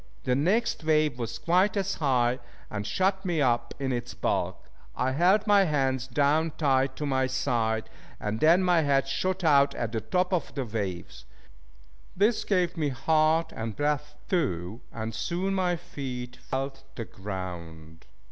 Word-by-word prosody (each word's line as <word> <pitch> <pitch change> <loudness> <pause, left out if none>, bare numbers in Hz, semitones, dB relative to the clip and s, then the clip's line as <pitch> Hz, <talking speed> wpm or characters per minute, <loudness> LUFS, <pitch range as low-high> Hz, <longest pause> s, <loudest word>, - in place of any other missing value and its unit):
The 125 - +1
next 180 - +1
wave 155 -4 +2
was 115 -1 -3
quite 185 +4 +2
as 195 0 0
high, 125 -4 +2 0.3
and 105 0 -3
shut 190 +1 +1
me 175 -4 0
up 120 -3 +1
in 135 -1 -2
its 120 -1 -3
bulk. - - -2 0.3
I 130 - 0
held 180 +9 +3
my 205 -2 +5
hands 135 -5 0
down 145 +4 +2
tight 135 -3 +2
to 150 - -3
my 130 -2 +1
side, 120 -4 0 0.3
and 105 +1 -3
then 170 +4 +5
my 175 -2 +4
head 140 -2 +2
shot 185 +6 -1
out 140 -3 +4
at 115 -2 -2
the 110 -1 -2
top 180 - 0
of 170 -6 -1
the 135 -3 -2
waves. 95 - -5 0.9
This 210 +4 +3
gave 180 -4 +1
me 150 -3 +1
heart 155 +4 +2
and 115 -1 -4
breath 150 0 -1
too, 110 - -1
and 110 0 -5
soon 180 - -1
my 180 -2 +1
feet 125 -6 -6
felt 135 +1 -4
the 115 - -4
ground. 85 -5 -8
140 Hz, 160 wpm, -27 LUFS, 120-170 Hz, 0.9 s, my